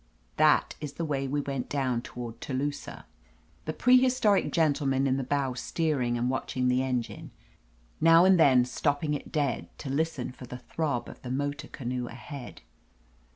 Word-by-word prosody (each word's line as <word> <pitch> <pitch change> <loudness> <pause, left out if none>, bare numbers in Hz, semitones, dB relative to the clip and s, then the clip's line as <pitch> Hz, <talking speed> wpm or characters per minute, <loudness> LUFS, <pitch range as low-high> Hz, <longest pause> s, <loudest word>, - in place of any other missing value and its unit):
That 155 -1 +4
is 145 -2 -5
the 170 - -3
way 135 -3 -1
we 145 +2 -1
went 135 -3 -4
down 130 -4 0
toward 120 -2 -8
Telu 140 +2 -1
sah: - - -9 0.6
the 155 - -1
prehistoric 250 -4 +4
gentleman 140 -4 +2
in 135 -1 +2
the 135 - -1
bow 135 0 0
steer 155 +2 -1
ing 120 -1 0
and 120 +1 0
watching 130 0 -1
the 125 +1 +2
engine, 125 -3 -3 0.7
now 165 +2 +7
and 190 -2 +5
then 130 -5 +6
stopping 145 +4 -1
it 145 - -5
dead 135 - -1
to 135 - -5
listen 145 -3 -1
for 125 0 -11
the 125 - -7
throb 140 0 -3
of - - -11
the 125 - -7
motor 145 +2 -2
canoe 125 -1 -4
ahead. 125 +2 -9
135 Hz, 170 wpm, -28 LUFS, 125-150 Hz, 0.7 s, now